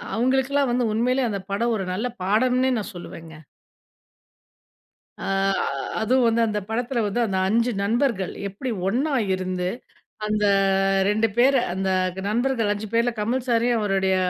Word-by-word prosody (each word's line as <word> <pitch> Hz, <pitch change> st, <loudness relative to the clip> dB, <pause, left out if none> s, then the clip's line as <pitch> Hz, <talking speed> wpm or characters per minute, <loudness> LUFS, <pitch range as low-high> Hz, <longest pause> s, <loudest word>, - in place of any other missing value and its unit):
அவங்களுக்கெல்லாம் 265 Hz, +3 st, +1 dB
வந்து 240 Hz, -2 st, +1 dB
உண்மையிலே 250 Hz, +3 st, +1 dB
அந்த 200 Hz, -2 st, -3 dB
படம் 230 Hz, +4 st, 0 dB
ஒரு 190 Hz, -, -3 dB
நல்ல 215 Hz, +7 st, -1 dB, 0.2 s
பாடம்னே 250 Hz, +6 st, +2 dB
நான் 215 Hz, +1 st, -6 dB
சொல்லுவேங்க. 165 Hz, -2 st, -9 dB, 1.9 s
அ, -, -, -3 dB, 0.7 s
அதுவும் 245 Hz, +3 st, +3 dB
வந்து 230 Hz, 0 st, +2 dB
அந்த 210 Hz, -1 st, -1 dB
படத்தில 240 Hz, +1 st, -1 dB
வந்து 205 Hz, +4 st, -1 dB
அந்த 195 Hz, -3 st, -2 dB
5 230 Hz, +4 st, +2 dB
நண்பர்கள் 225 Hz, -4 st, 0 dB, 0.2 s
எப்டி 210 Hz, +7 st, -5 dB, 0.2 s
ஒண்ணா 265 Hz, +9 st, 0 dB, 0.2 s
இருந்து, 185 Hz, -1 st, -2 dB, 0.6 s
அந்த 210 Hz, 0 st, 0 dB, 0.6 s
2 215 Hz, +2 st, +2 dB
பேர 265 Hz, +3 st, +5 dB, 0.2 s
அந்த 190 Hz, +1 st, -1 dB, 0.4 s
நண்பர்கள் 235 Hz, 0 st, 0 dB
5 210 Hz, +1 st, -6 dB
பேரில 235 Hz, +1 st, +2 dB
கமல் 235 Hz, +5 st, -1 dB
சாரையும், 235 Hz, 0 st, +2 dB
அவருடைய 195 Hz, -2 st, +1 dB
230 Hz, 135 wpm, -23 LUFS, 200-250 Hz, 1.9 s, பேர